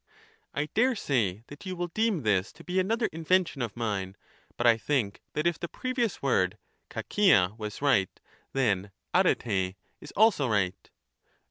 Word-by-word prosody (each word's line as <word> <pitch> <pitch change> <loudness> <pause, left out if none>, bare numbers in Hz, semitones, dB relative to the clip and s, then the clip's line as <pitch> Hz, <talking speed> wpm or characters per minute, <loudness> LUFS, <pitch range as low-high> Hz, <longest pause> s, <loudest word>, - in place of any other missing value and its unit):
I 145 - 0
daresay 135 - +1
that 145 +8 -11
you 185 - -3
will 175 0 -3
deem 215 - 0
this 100 -3 +1
to - - -14
be 185 +1 0
another 225 +5 +1
invention 165 -2 +1
of 120 -2 -4
mine, 100 -4 -2 0.4
but 120 - -1
I 115 -1 +7
think 115 -3 -1
that 150 - -1
if 170 -2 +1
the 170 - -3
previous 245 - -2
word 105 -7 +2 0.3
KOKla 105 - +3
was 105 +5 -6
right, 105 -10 +3 0.4
then 105 -7 +1 0.2
dperr] 95 -4 +2 0.3
is - - -10
also 200 - +4
right. 95 -3 -1
135 Hz, 150 wpm, -28 LUFS, -, 0.4 s, I